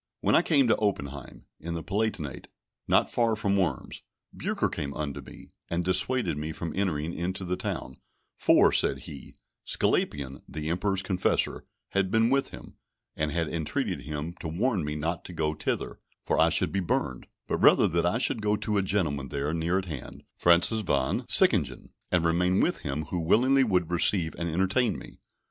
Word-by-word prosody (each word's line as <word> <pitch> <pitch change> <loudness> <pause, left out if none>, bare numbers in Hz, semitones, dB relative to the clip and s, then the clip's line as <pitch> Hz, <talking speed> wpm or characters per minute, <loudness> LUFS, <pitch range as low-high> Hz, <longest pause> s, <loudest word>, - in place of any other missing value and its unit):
When - - +2
I - - +6
came 145 -7 +3
to - - +4
Oppenheim, 70 - -3
in 85 +1 -5
the 80 - -5
Palatinate, 95 -7 -2 0.4
not - - +3
far 115 -2 +2
from 100 -2 0
Worms, 95 -3 -2 0.3
Bucer - - -1
came 70 -1 -5
unto 75 -2 -4
me, - - -13 0.2
and 85 +1 -1
dissuaded 95 - +1
me 75 +1 -4
from 85 -1 -5
entering 85 -4 -1
into 95 +2 -3
the 90 +1 -1
town; 65 -7 -5 0.4
for, - - +4
said - - +1
he, 70 - -10 0.3
Sglapian, 70 -2 -1
the 80 +1 -4
Emperor's 95 +2 0
confessor, 90 -1 0 0.2
had 100 -1 0
been 115 +3 +3
with 135 0 +1
him, - - -12 0.4
and 75 0 -1
had 85 0 0
entreated 80 -1 -2
him 75 +3 -5
to - - -5
warn 95 +4 0
me 75 0 -3
not 80 +3 -2
to 90 - -8
go 80 -2 -1
thither, 75 - -3 0.3
for - - +1
I - - +5
should - - +2
be 100 - 0
burned; 75 -7 -2 0.2
but - - -1
rather - - +6
that 85 +1 0
I 90 +6 +1
should 115 -2 0
go 105 0 +1
to 105 0 -1
a - - +3
gentleman 80 -9 -1
there 70 +2 -3
near 85 +3 0
at 95 - -2
hand, 75 -8 -8
Francis 85 +6 +4
Von 65 -9 -1
Sickingen, - - +3 0.2
and 90 -2 +2
remain 90 +3 +2
with - - +1
him, 70 +2 -3
who 90 - -1
willingly 130 +11 +4
would 90 -7 0
receive 85 -1 +2
and 85 0 -2
entertain 95 +8 +1
me. - - -12
85 Hz, 185 wpm, -27 LUFS, 75-100 Hz, 0.4 s, I